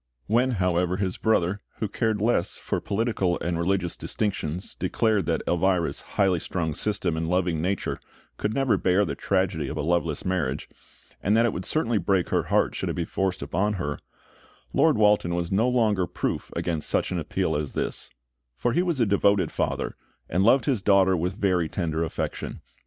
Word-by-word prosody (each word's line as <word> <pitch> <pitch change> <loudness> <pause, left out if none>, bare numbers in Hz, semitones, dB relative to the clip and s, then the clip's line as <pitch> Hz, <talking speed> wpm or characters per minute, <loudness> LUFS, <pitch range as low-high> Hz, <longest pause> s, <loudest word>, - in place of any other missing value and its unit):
When, 125 +4 +2
however, 90 -2 +1
his 95 -2 -2
brother, 100 -2 +1 0.2
who 110 - -1
cared 110 +1 0
less 110 -6 +1
for - - -3
political 100 -4 0
and 85 -1 -2
religious 90 0 0
distinctions, 95 -5 -3
declared 110 -4 0
that - - 0
Elvira's 90 0 +1 0.2
highly 95 -3 +3
strung 80 -3 -2
system 100 -3 0
and 80 0 -2
loving 90 -3 +1
nature 95 +2 -1 0.4
could 105 - -1
never 135 +1 +2
bear 95 +2 +3
the 75 - -3
tragedy 90 -2 0
of - - -5
a - - -1
loveless 85 +2 0
marriage, 85 -7 -1 0.5
and 105 +3 +2
that 115 - +4
it 115 - +1
would 90 - -5
certainly 120 -8 +1
break 95 0 +1
her - - +1
heart - - +2
should - - -3
it - - -2
be 85 - -1
forced 95 -4 -1
upon 95 +8 0
her, 75 -7 -3 0.7
Lord 155 -1 +4
Walton 105 -5 +3
was 85 -1 -2
no 110 +6 +3
longer 110 -7 +2
proof - - -3
against 80 -3 -1
such - - +1
an - - -1
appeal - - -1
as 75 -1 -3
this; - - -3 0.5
for 120 - 0
he 175 - +3
was 170 -6 -1
a 120 - +4
devoted 100 -3 +2
father, - - -2 0.3
and 90 - 0
loved 125 +5 +5
his 130 -8 +1
daughter 95 -2 +4
with 90 +2 -1
very 90 -6 +1
tender 80 -2 -1
affection. 80 - -4
95 Hz, 185 wpm, -26 LUFS, 85-105 Hz, 0.7 s, loved